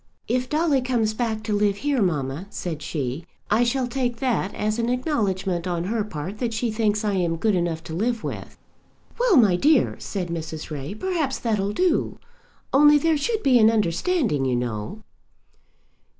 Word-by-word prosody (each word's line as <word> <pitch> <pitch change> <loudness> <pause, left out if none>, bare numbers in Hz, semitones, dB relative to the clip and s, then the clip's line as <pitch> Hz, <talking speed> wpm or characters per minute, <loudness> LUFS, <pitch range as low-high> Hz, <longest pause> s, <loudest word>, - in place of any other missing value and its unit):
"If 250 +2 -1
Dolly 305 -3 +2
comes 235 -4 0
back 220 -1 -2
to 220 -1 -2
live 205 -1 +2
here, 280 0 0
mamma," 150 -1 -1
said 165 -6 -5
she, 145 -1 -3 0.3
"I 220 +3 +4
shall 250 +2 0
take 245 -1 -1
that 230 -6 0
as 215 +2 -1
an 230 0 0
acknowledgment 195 - -1
on 175 -1 -1
her 215 +4 -1
part 190 +1 -6
that 235 -3 -2
she 230 +1 -1
thinks 215 -1 0
I 205 - +1
am 175 -3 0
good 215 +5 +1
enough 170 -3 -1
to 160 - -7
live 225 +6 -1
with." - - -6 0.6
"Well, 480 -8 +4
my 210 -8 +5
dear," 290 - +3
said 185 -4 -4
Mrs. 160 -2 -5
Ray, 145 +5 -5
"perhaps 315 -2 -1
that'll 210 -4 -1
do; 360 - +1 0.6
only 295 +2 +7
there 320 +2 +2
should 435 +9 -1
be 255 -3 +5
an 220 0 +6
understanding, 215 - +1
you 130 -2 +1
know." 120 - -4
215 Hz, 175 wpm, -24 LUFS, 175-255 Hz, 0.6 s, only